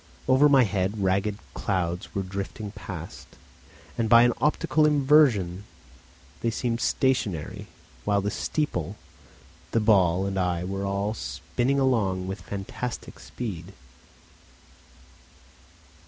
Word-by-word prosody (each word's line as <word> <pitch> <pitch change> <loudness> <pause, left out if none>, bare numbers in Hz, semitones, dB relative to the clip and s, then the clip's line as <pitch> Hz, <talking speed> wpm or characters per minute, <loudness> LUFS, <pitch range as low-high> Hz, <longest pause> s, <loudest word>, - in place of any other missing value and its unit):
Over 135 +3 +5
my 135 -2 +6
head 100 -1 -1
ragged 100 +2 +1 0.2
clouds 90 -3 -2
were 100 - 0
drifting 100 +2 -5
past, 95 -5 -8 0.7
and 115 -1 +1
by 115 0 +8
an 120 0 +4
optical 150 +1 +2
inversion 135 - +3 0.8
they 115 - +1
seemed 115 +1 -2
stationary, 105 - 0 0.4
while 100 -1 +2
the 100 +1 -2
steeple, 100 - -2 0.7
the 115 - +1
ball 95 -4 +3
and 95 -1 -2
I 90 -1 0
were 95 +1 -3
all 100 +2 -1
spinning 115 - -2
along 105 -9 +1
with 95 0 -5
fantastic 100 +6 -6
speed. 100 -6 -6
100 Hz, 110 wpm, -26 LUFS, 95-120 Hz, 0.8 s, by